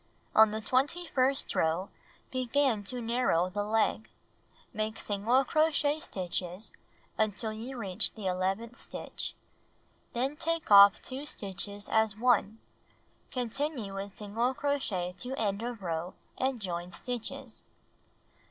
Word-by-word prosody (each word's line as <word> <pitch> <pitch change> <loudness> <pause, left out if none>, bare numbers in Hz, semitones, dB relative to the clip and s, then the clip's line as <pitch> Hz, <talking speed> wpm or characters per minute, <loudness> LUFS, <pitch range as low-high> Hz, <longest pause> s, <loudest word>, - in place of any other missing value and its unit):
On 220 0 +8
the 215 +1 -3
twenty 275 +10 +1
first 270 -2 +2
row, 165 +4 +1 0.4
begin 255 -3 +1
to 250 +5 -2
narrow 225 -7 +2
the 205 +2 -1
leg. 220 +1 +1 0.6
Make 215 0 -2
single 225 +6 +2
crochet 310 0 +2
stitches 185 - -3 0.5
until 215 +1 0
you 240 +4 -6
reach 200 -2 -1
the 215 -3 -7
eleventh 190 +6 -1
stitch. - - -5 0.8
Then 265 +5 -1
take 330 -5 -1
off 200 0 +9
2 270 +3 -5
stitches 200 -2 -2
as 220 -2 +2
one. 225 -3 +3 0.7
Continue 250 -3 -2
with 195 0 -6
single 230 +5 -1
crochet 225 -12 -1
to 255 +2 -3
end 205 -4 -1
of 235 -3 -5
row 170 +1 -3 0.2
and 260 -1 0
join 175 -3 -3
stitches. 245 +4 -4
220 Hz, 125 wpm, -30 LUFS, 200-255 Hz, 0.8 s, off